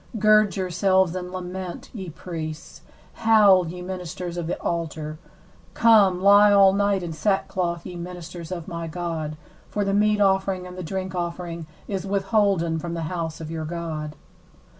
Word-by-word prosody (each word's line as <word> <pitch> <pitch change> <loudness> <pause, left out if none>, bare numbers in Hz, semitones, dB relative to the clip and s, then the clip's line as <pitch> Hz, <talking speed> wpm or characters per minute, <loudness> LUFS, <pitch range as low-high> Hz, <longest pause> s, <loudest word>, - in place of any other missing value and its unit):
13Gird 215 -2 +4
yourselves, 185 -1 +2
and 180 -1 -5
lament, 185 -1 -6
ye 190 -6 -6
priests: 160 -1 -7 0.4
howl, 205 -5 +6
ye 180 +2 -7
ministers 180 -1 -5
of 170 -2 -3
the 175 - -3
altar: 155 -2 -3 0.6
come, 210 -6 +5
lie 205 +2 +7
all 195 -1 +6
night 200 -1 +1
in 170 -2 -4
sackcloth, 175 -1 -1
ye 180 - -7
ministers 175 -1 -8
of 170 -3 -5
my 170 -1 -5
God: 160 -2 -4 0.3
for 205 -1 -1
the 195 - 0
meat 210 +1 +3
offering 190 -2 +2
and 180 0 -9
the 185 - -6
drink 185 +2 -4
offering 170 -2 -4 0.2
is 195 -3 -3
withholden 195 -4 +1
from 170 +1 -4
the 165 - -3
house 165 -2 -3
of 160 -1 -7
your 160 -1 -4
God. 155 -2 -5
180 Hz, 160 wpm, -24 LUFS, 170-195 Hz, 0.6 s, lie